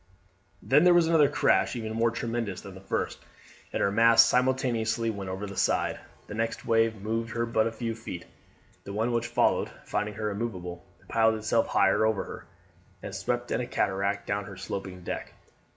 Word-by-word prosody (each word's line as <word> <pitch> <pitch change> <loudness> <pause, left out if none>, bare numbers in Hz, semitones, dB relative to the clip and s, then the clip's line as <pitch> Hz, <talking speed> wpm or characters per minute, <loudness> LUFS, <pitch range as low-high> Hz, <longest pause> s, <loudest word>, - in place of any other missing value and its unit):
Then 145 +4 +5
there 180 -1 +6
was 175 -1 +5
another 160 -3 +4
crash - - +2
even 110 -2 -4
more 115 +1 +2
tremendous 115 -4 -3
than 100 - -10
the 95 - -11
first, 95 - -2 0.5
and - - 0
her 100 - +2
masts 115 +2 +6
simultaneously 120 -3 +1
went 100 -3 -6
over 95 +2 -4
the 100 -1 -8
side. - - +1 0.3
The - - -8
next 115 +1 -2
wave 115 0 +3
moved 115 +3 -2
her 115 0 0
but 115 -1 +1
a - - -2
few 115 0 -3
feet; 110 -6 -7 0.6
the 100 - -7
one 110 +4 0
which 120 0 0
followed, - - +2 0.2
finding 105 0 -2
her 105 -1 -2
immovable, 90 -5 -5 0.2
piled 110 -1 +3
itself 110 +1 +1
higher 100 +2 +3
over 110 -2 +1
her, - - -9 0.6
and - - -6
swept 120 0 -2
in 125 - +1
a 120 - -4
cataract 100 -3 -1
down 100 0 -2
her 100 -2 -10
sloping 95 -2 -6
deck. - - -5
110 Hz, 185 wpm, -28 LUFS, 100-115 Hz, 0.6 s, there